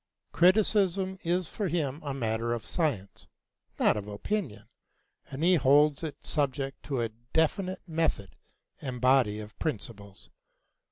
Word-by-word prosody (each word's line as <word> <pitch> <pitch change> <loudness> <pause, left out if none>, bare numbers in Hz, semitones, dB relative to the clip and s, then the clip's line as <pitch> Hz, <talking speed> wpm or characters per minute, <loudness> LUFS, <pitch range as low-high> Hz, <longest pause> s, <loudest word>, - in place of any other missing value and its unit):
Criticism 190 0 +3
is 175 0 0
for 205 +3 -3
him 155 -3 -2
a 145 - -3
matter 115 -2 -1
of 115 - -7
science, 130 - -2 0.5
not - - +4
of 105 -1 -5
opinion, 105 - -3 0.6
and 135 +4 -5
he 180 +2 +5
holds 145 -1 +4
it 160 -3 -7
subject 135 -2 -1
to 135 -4 -1
a 115 - -1 0.2
definite 185 +4 +1
method 160 - -1 0.5
and 130 -3 -5
body 125 -4 +3
of 105 -1 -10
principles. 100 - -5
140 Hz, 130 wpm, -29 LUFS, 115-170 Hz, 0.6 s, he